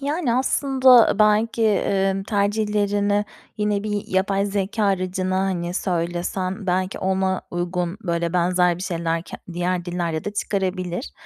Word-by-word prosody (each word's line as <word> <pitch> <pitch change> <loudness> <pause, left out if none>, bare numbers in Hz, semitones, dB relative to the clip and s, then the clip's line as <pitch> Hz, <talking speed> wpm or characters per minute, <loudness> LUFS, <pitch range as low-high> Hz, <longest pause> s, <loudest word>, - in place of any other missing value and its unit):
Yani 285 -3 -1
aslında 260 -2 +4
belki, 215 +2 +3 0.5
ımm, 195 - -3
tercihlerini 205 0 +1 0.3
yine 210 -1 0
bir 210 -1 -2
yapay 195 +1 +1
zekâ 205 +2 -1
aracına 185 -1 0
hani 180 -2 -2
söylesen 185 +2 -2
belki 185 +1 -1
ona 190 0 0
uygun 175 +1 -2
böyle 170 -2 -1
benzer 180 0 +2
bir - - -6
şeyler 165 -3 -2
ke - - -9 0.2
diğer 175 +1 -1
dillerde 170 -3 -3
de 205 - -3
çıkarabilir. 190 - -2
190 Hz, 130 wpm, -22 LUFS, 180-210 Hz, 0.5 s, aslında